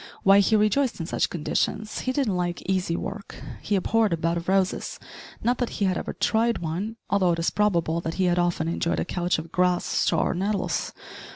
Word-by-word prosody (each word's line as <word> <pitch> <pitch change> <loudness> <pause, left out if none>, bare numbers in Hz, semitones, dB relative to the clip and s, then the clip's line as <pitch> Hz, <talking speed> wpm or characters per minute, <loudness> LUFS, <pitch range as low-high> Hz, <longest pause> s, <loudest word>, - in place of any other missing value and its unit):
Why, 195 +1 +7
he 210 +2 +3
rejoiced 215 +4 +2
in 165 - -3
such - - 0
conditions! 195 +6 -2
He 255 - -1
didn't 255 -8 0
like 175 -1 -2
easy 185 -3 0
work. 200 +3 -6 0.3
He 205 - 0
abhorred 215 +1 +2
a - - 0
bed 165 +1 0
of 170 +1 -4
roses 190 -1 0 0.5
not 240 +2 +1
that 245 - 0
he 205 - +1
had 185 -1 +1
ever - - -4
tried 230 +1 +1
one, 175 +7 -3
although 185 -3 +2
it - - -2
is 165 - 0
probable 170 -5 +1
that 165 0 -4
he 190 - 0
had 175 -1 +2
often 175 -2 0
enjoyed 170 0 -1
a - - -1
couch 175 0 0
of 160 +1 -7
grass, 180 -1 +2
straw, - - +1
or - - 0
nettles. 195 +3 -1
185 Hz, 210 wpm, -25 LUFS, 170-210 Hz, 0.5 s, Why